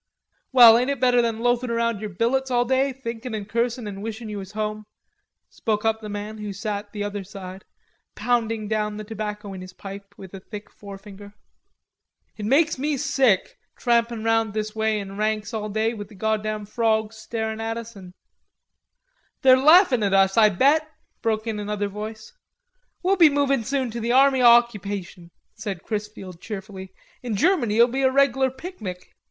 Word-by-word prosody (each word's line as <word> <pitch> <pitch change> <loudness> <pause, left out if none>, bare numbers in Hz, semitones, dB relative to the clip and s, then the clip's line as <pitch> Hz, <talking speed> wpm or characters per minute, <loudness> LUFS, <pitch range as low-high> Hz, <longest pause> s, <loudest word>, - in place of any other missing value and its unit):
"Well, 235 -3 +9
ain't 250 +2 0
it 280 -2 -2
better 245 -1 +4
than 230 -1 -2
loafin' 245 +1 +1
around 230 -2 -1
yer 215 - -4
billets 245 +8 0
all 245 -1 +2
day, 265 +2 +1
thinkin' 235 -2 -6
an' 210 -2 -5
cursin' 235 +1 -2
an' 200 -1 -7
wishin' 220 +1 -6
ye 210 - -5
was 195 0 -8
home?" 215 0 -4 0.6
spoke 215 -1 -2
up 220 0 +1
the 215 - -7
man 210 +1 -6
who 210 -1 -5
sat 205 0 -5
the 205 -1 -4
other 205 -1 -4
side, 190 -1 -10 0.5
pounding 225 -3 -1
down 210 -1 -1
the 215 - -6
tobacco 210 -1 -6
in 185 - -8
his 185 0 -10
pipe 200 +1 -10
with 190 -1 -12
a 195 - -7
thick 205 +2 -10
forefinger. 200 0 -12 1.0
"It 210 - -6
makes 295 +3 +3
me 290 +1 -1
sick, 250 -7 +1 0.2
trampin' 235 -2 +1
round 225 -1 +1
this 215 0 -3
way 220 -1 0
in 195 0 -8
ranks 215 +1 -1
all 215 -1 -3
day 220 +2 0
with 205 -3 -7
the 215 - -16
goddam 215 +1 -2
frawgs 220 0 0
starin' 220 0 -4
at 225 0 -3
us 230 0 -8
an'..." 185 -2 -12 1.3
"They're 260 -1 +8
laughin' 290 - +6
at 200 -2 +2
us, 195 0 +4
I 215 -2 +6
bet," 290 - +2 0.3
broke 220 -1 -1
in 220 -2 -3
another 205 0 -2
voice. 215 +2 -8 0.7
"We'll 385 +2 +2
be 330 -4 +7
movin' 280 -3 +1
soon 260 0 -2
to 235 - -5
the 235 +1 -1
Army 270 0 +5
o' 245 - +7
Occupation," 205 -7 +2 0.2
said 200 -5 -6
Chrisfield 210 -5 -6
cheerfully. 195 -3 -8 0.3
"In 240 -4 -3
Germany 245 - +2
it'll 235 +2 +6
be 260 +2 -2
a 265 - +4
reglar 270 -1 +3
picnic." 245 - -8
220 Hz, 180 wpm, -23 LUFS, 205-240 Hz, 1.3 s, Well